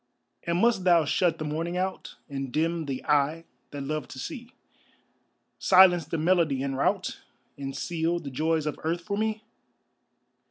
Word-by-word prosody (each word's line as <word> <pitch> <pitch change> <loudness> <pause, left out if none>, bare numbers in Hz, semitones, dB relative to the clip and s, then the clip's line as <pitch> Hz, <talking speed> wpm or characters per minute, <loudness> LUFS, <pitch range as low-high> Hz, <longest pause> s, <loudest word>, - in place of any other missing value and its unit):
And 170 0 +1
must 225 -1 +3
thou 170 -3 +5
shut 165 +2 +1
the 155 - -4
morning 165 +4 -2
out, 190 +1 -3
And 135 -3 -5
dim 165 +3 0
the 135 -2 -5
eye 150 +3 +1 0.2
that 145 -1 -6
loved 150 -2 -3
to - - -9
see; 235 - -6 1.1
Silence 180 -3 +6
the 165 +2 -3
melody 160 -5 +2
and 135 -1 -2
rout, 135 - -1 0.3
And 135 -1 -6
seal 170 0 -1
the 145 -5 -7
joys 160 +3 0
of 150 - -3
earth 165 +2 -1
for 200 +3 -3
me? 215 +1 -1
165 Hz, 160 wpm, -27 LUFS, 145-175 Hz, 1.1 s, Silence